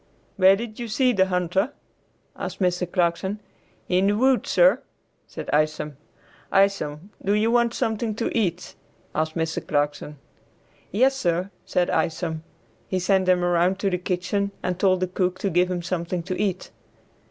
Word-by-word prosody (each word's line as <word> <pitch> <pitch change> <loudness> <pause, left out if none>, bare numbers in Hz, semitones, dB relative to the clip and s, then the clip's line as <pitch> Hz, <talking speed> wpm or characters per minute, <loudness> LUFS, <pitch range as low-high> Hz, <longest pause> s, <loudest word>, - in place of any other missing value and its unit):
"Where 190 0 +6
did 220 +1 -7
you 240 - -4
see 250 +3 +2
the 190 -3 +3
hunter?" 185 - 0 0.6
asked - - -6
Mr. 180 -2 0
Clarkson. 185 +3 0 0.5
"In 185 +2 +2
the 205 +1 +2
woods, 260 +1 +2
sir," - - +5 0.5
said - - -8
Isom. 150 -1 0 0.6
"Isom, 195 -3 +1
do 200 - +1
you 215 +2 +2
want 235 -1 +2
something 220 0 -1
to 230 - -2
eat?" 180 -6 -1 0.4
asked 155 +1 -1
Mr. 160 -1 -2
Clarkson. 145 0 -1 0.7
"Yes, 260 +7 +3
sir," 180 -5 -1 0.2
said 180 -1 +1
Isom. 160 -1 -1 0.5
He 185 - -1
sent 185 0 +2
him 180 -1 +3
around 175 +2 +2
to 200 -1 0
the 180 - 0
kitchen 185 +2 -1
and 180 0 -2
told 185 -2 +3
the 185 - +1
cook 180 0 -1
to 195 - -2
give 180 +2 +3
him 175 -1 -2
something 175 -1 -2
to 185 +1 -3
eat. 190 -3 -2
185 Hz, 160 wpm, -24 LUFS, 175-205 Hz, 0.7 s, Where